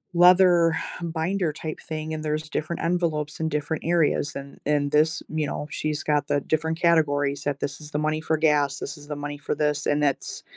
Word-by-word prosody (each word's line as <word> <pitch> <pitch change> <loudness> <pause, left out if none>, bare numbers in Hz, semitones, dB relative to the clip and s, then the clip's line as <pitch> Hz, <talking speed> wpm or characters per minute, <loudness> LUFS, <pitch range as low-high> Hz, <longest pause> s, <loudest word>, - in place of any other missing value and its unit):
leather 175 -2 +6 0.3
binder 170 +1 -1
type 155 +1 -6
thing, 155 0 -5
and 155 0 -4
there's 155 0 -2
different 155 +2 -3
envelopes 165 -3 -1
in 160 0 0
different 150 +1 -2
areas. 165 -4 +1
And 140 0 -8
and 145 -1 +1
this 155 +3 +3
you 155 -1 -1
know, 145 +1 -4
she's 155 0 -2
got 145 -1 +1
the 145 - +1
different 160 +3 -1
categories 145 -4 +2
that 145 -1 -2
this - - -3
is 150 0 -10
the 150 - -1
money 155 0 0
for 160 0 0
gas, 145 -3 +2
this 145 +3 -5
is 145 0 -13
the 150 - -4
money 145 0 -5
for 145 - -3
this, 150 -1 0
and 145 0 +1
that's 140 -2 -1
155 Hz, 205 wpm, -25 LUFS, 145-160 Hz, 0.3 s, leather